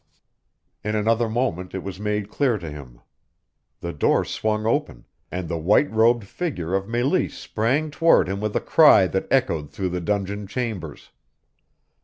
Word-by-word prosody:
In 105 +1 -2
another 115 +2 +1
moment 110 -7 -2
it 95 - -4
was 95 -1 -7
made 105 -1 -2
clear 130 -6 +1
to 85 -5 -7
him. 65 -5 -11 0.8
The 85 0 -4
door 75 - +2
swung 110 0 -2
open, 145 +7 -1 0.3
and 90 -1 -4
the 85 0 -3
white 105 - +3
robed 115 +1 +3
figure 95 - -4
of 95 0 0
Meleese 120 +9 0
sprang 135 +8 -1
toward 165 - +4
him 100 +2 -3
with 105 -1 -2
a - - +1
cry 150 -11 +6
that 95 +1 -2
echoed 85 - +1
through 95 -2 -3
the 90 0 -3
dungeon 100 +2 -2
chambers. 105 - -5
105 Hz, 160 wpm, -23 LUFS, 90-120 Hz, 0.8 s, cry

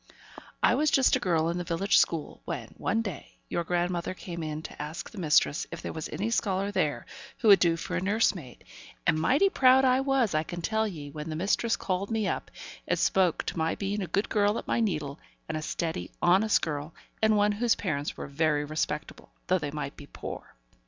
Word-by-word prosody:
I - - +5
was 305 +1 +2
just 270 -1 +4
a - - +1
girl 165 -6 +1
in 170 +1 -2
the - - -2
village 175 +4 +2
school, 160 -3 -1
when, - - -5
one 225 +4 0
day, 195 -9 -7 0.2
your 170 - -1
grandmother 175 +1 -1
came 170 -2 -7
in 155 0 -4
to - - -8
ask 150 +2 -5
the 215 - -9
mistress 150 -2 +2
if - - -7
there - - -4
was 160 -1 -5
any 205 +9 -2
scholar 200 -3 0
there - - -1 0.3
who 225 - +2
would 200 - +9
do 170 -2 +3
for 180 +2 -4
a 180 - 0
nurse 205 +4 +2
maid; 140 -10 -11 0.4
and 155 - +3
mighty 275 - +4
proud 265 -6 +5
I 255 0 +4
was, 270 -7 +1
I 155 - +2
can 175 +2 -6
tell 220 +3 +1
ye, 150 -7 -7
when 150 +2 -6
the 155 - -3
mistress 200 +6 +1
called 190 +1 -2
me 220 -3 0
up, - - -3 0.4
and - - +1
spoke 185 -3 +2
of - - -14
me 160 0 0
being 200 +1 -2
a 185 - -3
good 200 +4 0
girl 205 0 +2
at - - -5
my - - +1
needle, 150 -10 -1 0.3
and 160 - -3
a 155 - -2
steady, 155 - -3
honest 195 +5 +4
girl, 150 0 -4 0.3
and 220 -1 +4
one 205 0 +3
whose 230 +3 +2
parents 145 -7 -3
were - - -5
very 150 +1 0
respectable, 150 0 -4 0.2
though 185 0 +2
they 150 -2 -3
might 145 -1 -5
be 145 - -12
poor. - - -8
180 Hz, 220 wpm, -28 LUFS, 155-210 Hz, 0.4 s, would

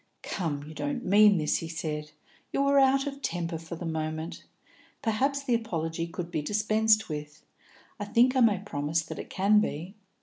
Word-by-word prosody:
"Come, 155 -7 -3
you 155 - -9
don't 275 - -3
mean 205 +1 +6
this," 155 -2 +1
he 165 - -5
said. 150 -2 -4 0.4
"You 275 - +1
are 280 0 +4
out 270 +1 +4
of 280 0 -5
temper 170 - -2
for 165 +1 -7
the 170 - -7
moment. 160 0 -4 0.6
Perhaps 270 +5 0
the 255 - 0
apology 165 -7 -2
could 170 0 -6
be 160 -3 -1
dispensed 215 +4 +2
with; 150 -1 -7 0.6
I 205 - -3
think 245 +5 +3
I - - +3
may 220 -4 +5
promise 160 -4 -2
that - - -7
it - - -7
can 205 +2 +4
be. 175 -2 -3
185 Hz, 180 wpm, -28 LUFS, 160-225 Hz, 0.6 s, mean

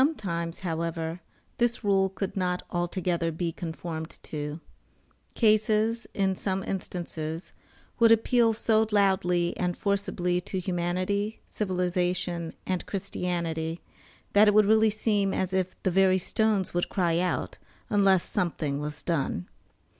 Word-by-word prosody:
Sometimes, 175 - -2
however, 165 -1 -3 0.4
this 240 0 +1
rule 195 -2 +3
could 190 0 -4
not 180 -2 -1
altogether 175 -1 -1
be 165 +1 -2
conformed 160 -1 -6
to. 150 +1 -5 0.8
Cases, 220 +1 +2
in 190 -1 +1
some 190 0 -2
instances, 170 -3 -4 0.5
would 230 -1 +6
appeal 230 +1 +4
so 220 0 +2
loudly 185 -4 +2
and 180 -1 -1
forcibly 180 -3 0
to 190 +1 -4
humanity, 185 +4 -1
civilization, 180 -3 -1
and 185 -1 -2
Christianity, 170 -4 -3 0.5
that 210 +1 +7
it 210 - +4
would 215 -1 +7
really 220 +1 +5
seem 205 -2 +1
as 190 0 -1
if 185 -1 0
the 185 - +2
very 190 +1 +4
stones 205 0 0
would 175 0 0
cry 170 -3 +1
out, 180 0 -2 0.3
unless 195 -3 +4
something 155 -7 -1
was 150 0 -5
done. 140 - -1
185 Hz, 125 wpm, -27 LUFS, 170-205 Hz, 0.8 s, that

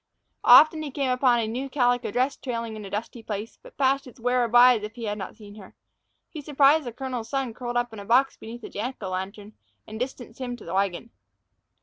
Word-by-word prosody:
Often 310 0 +7
he 305 - -4
came 270 -1 -1
upon 250 -1 +3
a 220 - -2
new 255 +5 -4
calico 245 -3 +1
dress 255 +6 0
trailing 230 -3 -5
in 215 - -8
a - - -8
dusty 220 +4 -5
place, 215 0 -6
but - - -16
passed 275 0 +1
its 255 +1 -14
wearer 245 0 +1
by 245 +2 +7
as - - -8
if 215 +2 -7
he 240 - -8
had 210 -1 -3
not 190 - -7
seen 205 -2 -13
her. 195 -3 -13 0.5
He 310 - -8
surprised 290 +1 +3
the 240 - -4
colonel's 250 -2 -5
son 270 -4 -2
curled 240 0 -4
up 240 -1 -1
in 220 - -8
a 200 - -9
box 255 +5 +3
beneath 230 +1 -10
a - - -7
Jack 245 +6 -4
o' 190 - -3
lantern, 200 +3 -6 0.3
and 220 +1 -8
distanced 250 -1 -6
him 245 -1 -3
to - - -13
the 170 - -6
wagon. 195 +3 -1
240 Hz, 235 wpm, -25 LUFS, 215-260 Hz, 0.5 s, Often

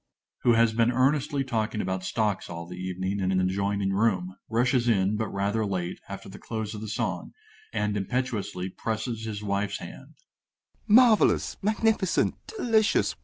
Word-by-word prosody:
GOLD 120 -2 +5
(_who - - +2
has 115 -1 +4
been 115 +1 +3
earnestly 135 +2 +2
talking 110 -4 -2
about 95 -1 -2
stocks 105 +1 -1
all 85 0 -6
the 90 +1 -8
evening 95 +2 -3
in 95 -1 0
an 95 - +2
adjoining 100 +1 0
room, 95 -3 +1
rushes 120 +1 +2
in, 100 -1 +2
but 110 +1 -1
rather 100 +3 -1
late, 90 -4 -3
after 100 0 -7
the 95 - -10
close 110 -2 -4
of 105 - -7
the 110 - -5
song, 110 +3 -3 0.4
and 105 0 -1
impetuously 105 -3 -2
presses 110 +3 -3
his 105 -2 -5
wife's 100 0 -1
hand_). - - -11 0.7
Marvellous! 230 0 +5
magnificent! 215 -2 +2
delicious! 225 - +2
105 Hz, 160 wpm, -27 LUFS, 95-120 Hz, 0.7 s, GOLD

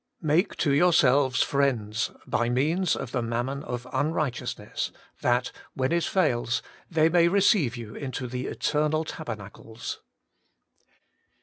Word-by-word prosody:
' - - -52
Make 180 +6 +2
to 150 - +1
your 175 +5 +4
selves 135 -4 +4
friends 120 -6 0 0.2
by 120 0 0
means 155 +8 +1
of 120 - -5
the 130 - 0
mammon 120 +4 -2
of 125 -2 -5
unrighteousness, 145 -1 -2 0.3
that, 125 0 +1 0.2
when 130 0 0
it 170 0 +2
fails, 120 -10 +1 0.3
they 160 -2 +4
may 170 0 +4
receive 185 - +3
you 115 -3 -8
into 130 -2 -5
the 125 +1 -4
eternal 155 +1 0
taber 155 -4 -5
nacles.' 110 +2 -8
135 Hz, 135 wpm, -27 LUFS, 120-160 Hz, 0.3 s, your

